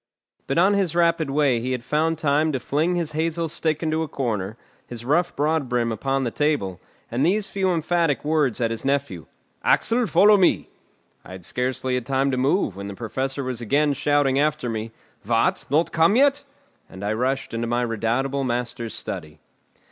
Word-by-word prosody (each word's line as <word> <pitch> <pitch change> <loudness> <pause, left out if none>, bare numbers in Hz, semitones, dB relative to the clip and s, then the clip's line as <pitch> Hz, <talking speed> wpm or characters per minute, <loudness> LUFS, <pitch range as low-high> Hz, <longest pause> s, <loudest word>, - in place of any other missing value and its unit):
But 135 - -1
on 190 +4 +5
his 190 -5 0
rapid 170 -3 +2
way 135 -4 +2
he 130 +2 -2
had 125 -2 -4
found 160 +4 0
time 155 +1 +2
to 130 - -1
fling 155 +8 0
his 170 -3 -1
hazel 165 +2 -1
stick 155 0 -1
into 160 0 0
a 160 - -2
corner, 110 -7 -3 0.3
his 120 -1 -8
rough 170 +7 +1
broadbrim 135 -6 0
upon 135 +5 -1
the 120 - -2
table, 140 - -1 0.3
and 120 +4 0
these 195 +6 +2
few 190 -1 0
emphatic 165 -3 0
words 150 -5 +1
at 115 -2 0
his 115 - -4
nephew: 135 - -1 0.4
"Axel, 235 0 +2
follow 210 +1 +6
me!" 185 -3 +2 0.5
I - - -11
had 95 -2 -10
scarcely 130 +1 -2
had 125 -2 -2
time 135 0 +1
to 130 - -1
move 130 - +1
when 100 +1 -6
the 100 - -7
Professor 135 +5 -3
was 125 -2 -4
again 145 +5 +2
shouting 140 -1 +2
after 150 -3 0
me: 110 0 -4 0.3
"What! - - +1
not 155 +5 +2
come 165 +5 +3
yet?" 280 +2 +3 0.4
And 95 +2 -8
I 105 - 0
rushed 130 +3 -1
into 115 +1 -2
my 120 +1 0
redoubtable 120 +5 -1
master's 120 -2 -3
study. 80 -8 -6
135 Hz, 185 wpm, -23 LUFS, 120-160 Hz, 0.5 s, follow